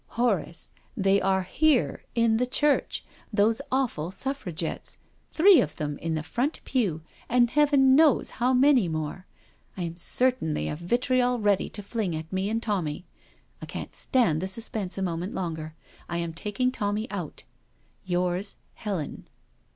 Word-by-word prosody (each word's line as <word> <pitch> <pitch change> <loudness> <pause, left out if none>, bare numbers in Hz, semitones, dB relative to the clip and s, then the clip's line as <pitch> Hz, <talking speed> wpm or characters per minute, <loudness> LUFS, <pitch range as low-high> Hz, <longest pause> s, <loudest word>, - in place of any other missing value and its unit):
" - - -40
Horace— 200 -8 0 0.3
they 195 -1 +3
are 190 0 +2
here— 290 - +2
in 230 -1 +3
the 250 +2 +1
church. 290 +3 +1 0.3
Those 215 +1 +3
awful 250 - 0
Suffragettes. 190 - -3 0.3
Three 360 +2 +7
of 150 - -3
them 145 -1 -4
in 165 0 -2
the 155 - -2
front 250 - -2
pew 200 - 0 0.3
and 240 -1 +3
Heaven 280 -3 +5
knows 300 -3 +4
how 250 +2 +4
many 260 -5 +5
more. 160 +3 -4 0.5
I 180 - -2
am 170 0 -5
certain 245 -5 0
they - - -2
have 150 - -4
vitriol 245 +6 +1
ready 205 -2 +2
to 205 - -7
fling 200 -4 -2
at 160 +3 -7
me 190 +2 0
and 225 +1 -1
Tommy. 180 -6 -2 0.6
I - - -7
can't - - -6
stand 175 -12 +2
the 190 - -2
suspense 200 -2 -4
a 195 - -1
moment 175 +1 -3
longer— 160 -3 -4 0.3
am 170 -1 -2
taking 210 +9 -1
Tommy 210 -1 -2
out.— 180 -7 -5 0.7
Yrs. 180 +2 0 0.2
Helen.' 195 -8 -5
200 Hz, 155 wpm, -27 LUFS, 170-250 Hz, 0.7 s, Three